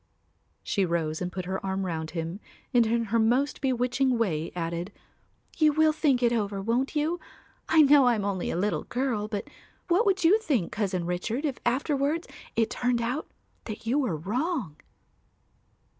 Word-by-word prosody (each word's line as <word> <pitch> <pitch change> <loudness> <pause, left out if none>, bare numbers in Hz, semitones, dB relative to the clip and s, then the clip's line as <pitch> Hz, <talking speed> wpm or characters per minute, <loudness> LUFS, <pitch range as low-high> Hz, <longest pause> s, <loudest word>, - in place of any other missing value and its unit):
She 200 - 0
rose 165 -2 -1
and 180 0 -2
put 185 0 -5
her 190 +1 -3
arm 190 0 -2
round 160 -3 -3
him 165 +4 -3 0.3
and 240 -2 +5
in 230 +1 +1
her 230 - +4
most 250 +6 +1
bewitching 255 0 +1
way 165 -8 -1
added, 170 +2 -3 0.7
"You 305 -2 +5
will 315 +1 +4
think 275 -5 +2
it 240 0 +4
over, 205 -3 -1
won't 235 +8 -1
you? 315 +4 0 0.5
I 320 -1 +7
know 285 -1 +6
I 240 - +4
am 205 -2 -2
only 195 -3 -2
a - - -2
little 205 +3 -1
girl, 240 -4 -1
but 205 -2 -4 0.4
what 375 +6 +3
would 380 -2 +2
you 380 +7 +6
think, 265 - 0
Cousin 190 -5 -1
Richard, 210 - -2
if 275 -4 -2
afterwards 285 +5 0 0.3
it 225 -1 +1
turned 245 -1 0
out 245 +6 -2 0.4
that 215 0 -7
you 250 +6 +2
were 235 - 0
wrong?" 220 - -2
235 Hz, 175 wpm, -27 LUFS, 190-275 Hz, 0.7 s, I